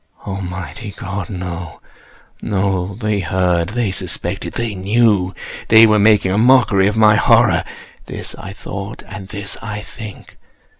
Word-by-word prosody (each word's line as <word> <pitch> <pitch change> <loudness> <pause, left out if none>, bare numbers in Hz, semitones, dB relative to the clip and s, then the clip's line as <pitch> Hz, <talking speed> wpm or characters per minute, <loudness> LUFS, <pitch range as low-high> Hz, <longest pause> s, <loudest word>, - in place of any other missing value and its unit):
Almighty 95 0 -6
God!—no, 90 -3 -6 0.6
no! 95 -1 -1
They 105 -1 -1
heard!—they 90 +4 0
suspected!—they 115 +4 -3
knew!—they 105 +1 +3
were 105 -1 +4
making 105 -2 +4
a 100 - +1
mockery 110 -6 +4
of 105 +2 -1
my 105 -1 +6
horror!—this - - 0
I 95 - -9
thought, 100 +2 -7
and 95 -2 -8
this 100 0 -5
I 105 -1 -5
think. 110 -3 -11
100 Hz, 110 wpm, -18 LUFS, 95-110 Hz, 0.6 s, my